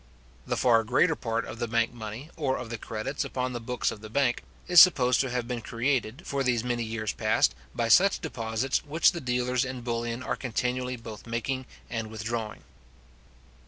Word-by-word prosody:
The - - -1
far 115 -3 +4
greater 130 +9 +3
part 115 -3 -2
of 115 - -8
the 120 - -1
bank 115 +1 +1
money, 115 +6 -7
or 135 -5 0
of 120 -2 -7
the 115 - -4
credits 110 +7 -3
upon 125 0 -3
the 120 - -3
books 125 +1 -1
of 105 - -9
the 110 - -9
bank, 125 +1 +1 0.3
is 180 -2 +9
supposed 125 -9 +5
to 135 - -2
have 125 -1 -2
been 120 -1 -3
created, 125 +4 -1
for 140 -1 -1
these 120 -3 +1
many 120 -1 -1
years 110 -2 -2
past, - - +2 0.2
by 115 - 0
such 190 - +5
deposits, 115 - -2
which 155 +3 +3
the 170 - -6
dealers 125 0 0
in 130 -1 -5
bullion 120 0 -3
are - - -1
continually 125 +1 -2
both 115 -2 -10
making 125 +3 -2 0.2
and 115 -2 -3
withdrawing. 110 0 -4
120 Hz, 190 wpm, -28 LUFS, 115-130 Hz, 0.3 s, is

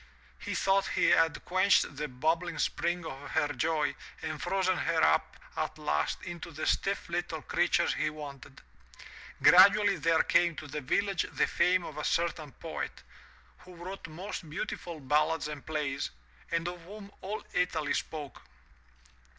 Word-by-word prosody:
He - - -4
thought 195 0 +2
he - - +3
had 165 -2 +3
quenched 185 -4 +3
the 150 +2 -3
bubbling 160 +6 -1
spring 175 +3 -1
of 135 -1 -7
her 150 -2 +1
joy 150 +2 0 0.3
and 155 -1 -4
frozen 190 -1 +1
her 165 -2 +1
up 75 +1 +2 0.2
at - - -2
last 75 +1 -1
into 175 -3 -6
the - - -5
stiff - - 0
little - - -3
creature - - +2
he 155 - 0
wanted. 140 -3 -10 0.8
Gradually 200 +3 +7
there 160 +1 +3
came 170 -1 +3
to 155 - -7
the 150 +1 -5
village 195 +7 0
the - - +3
fame 180 +1 +2
of 150 -2 -7
a - - -3
certain 165 -3 0
poet, - - -6 0.6
who 180 -1 -14
wrote 180 +3 -7
most 170 +1 -7
beautiful 165 +1 -5
ballads 150 +3 +1
and 150 -2 -7
plays, 145 -3 -2 0.4
and 170 0 0
of 175 0 -5
whom 200 +1 -10
all 210 +3 -4
Italy 180 -5 0
spoke. 150 -4 -4
165 Hz, 150 wpm, -30 LUFS, 150-180 Hz, 0.8 s, Gradually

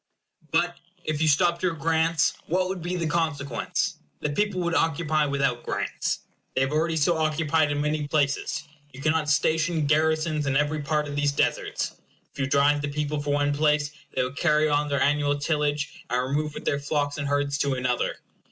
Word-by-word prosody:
But - - +1 0.3
if 155 -1 -1
you 160 - +3
stopped 170 +3 +3
your 180 -3 0
grants, 160 +1 +2
what 185 +2 +1
would 185 -1 -4
be 175 +2 -2
the 170 -2 -1
consequence? 145 -5 -1 0.2
The 150 - -2
people 205 +3 0
would 170 0 -1
occupy 155 -2 +1
without 140 -3 0
grants. - - -2 0.3
They - - +2
have 135 +1 +1
already 160 +2 +1
so 160 +2 +2
occupied 155 -1 +2
in 145 0 0
many 150 0 -1
places. 145 0 0 0.3
You 130 - -10
cannot 155 +1 +1
station 160 +2 +2
garrisons 155 0 +1
in 135 0 +2
every 150 +1 0
part 150 +1 0
of 145 - -5
these 145 0 +2
deserts. 140 - -1 0.4
If - - -13
you 135 - +1
drive 145 +1 +3
the 145 - -2
people 150 0 -2
from 145 0 -1
one 145 0 +2
place, 150 0 +2 0.2
they 130 - +2
will 125 - -3
carry 150 0 +3
on 145 0 +1
their 140 -1 0
annual 145 0 +2
tillage, 150 0 -1
and 125 +1 +1
remove 150 +1 -1
with - - -7
their 140 - +1
flocks 145 0 -1
and 145 - -2
herds 145 0 0
to 140 -2 +1
another. 125 -1 0
150 Hz, 190 wpm, -26 LUFS, 145-160 Hz, 0.4 s, you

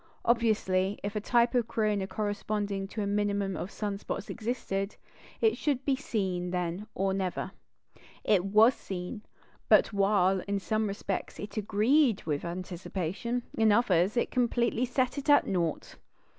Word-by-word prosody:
Obviously, 210 -5 +2
if 205 +1 -4
a 210 - -1
type 235 +3 +3
of 240 -3 +2
corona 210 -3 0
corresponding 205 0 -2
to 210 +1 -4
a - - -1
minimum 200 -1 0
of 180 - -4
sun 205 -2 -4
spots 200 - -5
existed, 215 -4 -3 0.5
it 445 -1 +4
should 280 -3 -1
be 275 - +2
seen 190 -9 -2
then 180 +3 -3
or 195 0 0
never. 190 -2 -2 0.7
It 195 -4 +3
was 215 +5 +5
seen; 190 +1 -6 0.5
but - - +5
while, 195 -1 +3
in 200 0 0
some 215 +2 -1
respects, 200 -1 -4
it 205 - -7
agreed 220 +4 +2
with 150 -2 -2
anticipation, 185 +6 -4
in 220 -1 +4
others 205 -2 +3
it - - +1
completely 240 0 +1
set 255 +2 0
it 280 - -5
at 290 - +6
naught. 170 -5 -2
205 Hz, 150 wpm, -29 LUFS, 190-235 Hz, 0.7 s, at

